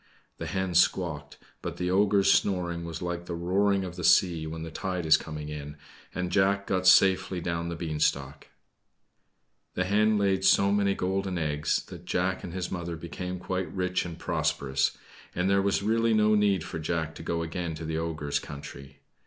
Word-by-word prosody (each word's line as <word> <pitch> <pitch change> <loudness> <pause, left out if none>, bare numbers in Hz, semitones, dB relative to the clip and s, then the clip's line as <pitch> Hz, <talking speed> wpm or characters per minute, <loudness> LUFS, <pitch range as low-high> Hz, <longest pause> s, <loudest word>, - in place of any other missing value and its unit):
The - - -4
hen 95 0 -2
squawked, 80 -4 +1 0.2
but - - -5
the 90 0 -1
ogre's 100 +1 +4
snoring 85 -3 0
was 85 0 -6
like 85 0 -4
the 85 - -3
roaring 95 +3 +1
of 90 -1 -8
the - - -5
sea 85 -4 +4
when 80 +1 -6
the 80 - -7
tide 90 0 -3
is 80 -1 +7
coming 75 -1 -5
in, 75 0 -7 0.4
and 90 0 -2
Jack 100 +1 +2
got 95 -1 0
safely 95 -1 +5
down 85 0 -3
the 85 - -4
beanstalk. 75 -3 -2 1.3
The 90 - +1
hen 105 +3 +3
laid 95 -2 +1
so 100 +1 +5
many 100 -1 +2
golden 95 0 -1
eggs 75 -2 -1
that - - -11
Jack 90 +1 -1
and 85 - -6
his 90 0 -4
mother 85 -2 -4
became 90 +2 -6
quite 95 +1 -3
rich 90 -1 -1
and 85 -2 -7
prosperous; 70 -1 0 0.4
and 90 +1 0
there 100 0 +3
was 100 0 0
really 115 +1 +2
no 105 0 +4
need 100 -4 +2
for 80 - -6
Jack 80 0 -2
to - - -10
go 85 0 -2
again 85 0 -4
to 80 +1 -7
the 80 0 -2
ogre's 80 -3 -2
country. 70 -1 -10
90 Hz, 185 wpm, -28 LUFS, 80-95 Hz, 1.3 s, is